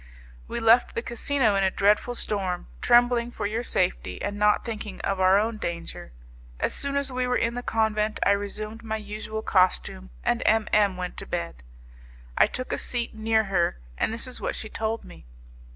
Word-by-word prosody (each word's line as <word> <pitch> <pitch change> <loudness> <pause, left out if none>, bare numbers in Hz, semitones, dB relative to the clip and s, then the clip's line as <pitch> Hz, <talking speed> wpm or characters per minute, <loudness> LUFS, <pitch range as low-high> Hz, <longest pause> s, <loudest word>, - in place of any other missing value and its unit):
We - - -3
left 230 +2 +4
the 230 - -2
casino 235 -1 +1
in 195 - +2
a 190 - +4
dreadful 210 +6 +2
storm, 190 -6 -2 0.2
trembling 240 0 +4
for 240 - -5
your 220 +3 -1
safety, 185 -6 -1
and 205 - -3
not 210 0 +3
thinking 215 -4 -5
of 195 -1 -1
our 185 +1 +5
own 215 +1 0
danger. 170 - -5 0.5
As - - 0
soon 280 0 -2
as 280 -1 +1
we 255 0 -1
were 250 - +2
in 230 0 0
the 245 - -4
convent 220 -2 0
I - - +5
resumed 210 +2 -3
my 220 -1 -3
usual 215 +1 -6
costume, 185 - +1
and - - +1
M 220 0 +3
M 205 -3 +4
went 180 -1 -5
to - - -6
bed. 85 -8 -4 0.7
I - - +5
took 255 - -4
a - - -1
seat 240 -2 -2
near 220 0 +2
her, 180 - 0 0.2
and - - 0
this 230 +3 -2
is 255 -1 -8
what - - -2
she 220 - -5
told 220 +1 -3
me. - - -14
215 Hz, 195 wpm, -26 LUFS, 195-235 Hz, 0.7 s, our